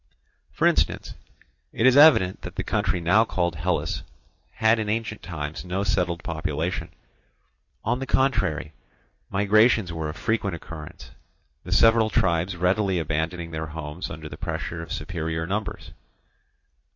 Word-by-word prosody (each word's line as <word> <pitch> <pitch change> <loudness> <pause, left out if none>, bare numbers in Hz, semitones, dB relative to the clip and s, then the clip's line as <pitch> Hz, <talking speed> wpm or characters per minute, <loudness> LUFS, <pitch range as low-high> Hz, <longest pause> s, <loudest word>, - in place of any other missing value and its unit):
For - - 0
instance, - - +1 0.6
it 115 - 0
is 130 0 +6
evident 140 -12 +6
that - - -8
the - - -2
country 95 -2 0
now 90 +7 +4
called 85 -6 -1
Hellas 90 0 -1 0.5
had 110 +1 +3
in 105 -1 -2
ancient 110 -1 -2
times 80 -3 -5
no 95 +2 -2
settled 90 -3 0
population; 80 +1 -3 1.0
on 125 - +1
the 135 - -4
contrary, 80 - +1 0.6
migrations 105 -1 +3
were 80 -2 -3
of 75 - -6
frequent 105 -5 -1
occurrence, 80 -2 -10 0.5
the - - -8
several 115 -1 +5
tribes 90 -1 +1
readily 95 +2 +1
abandoning 80 +2 -2
their 80 0 -4
homes 80 +2 -6
under 75 +1 -7
the - - -9
pressure 85 0 -4
of 80 - -9
superior 80 0 -3
numbers. 100 +4 -4
90 Hz, 140 wpm, -25 LUFS, 80-105 Hz, 1.0 s, is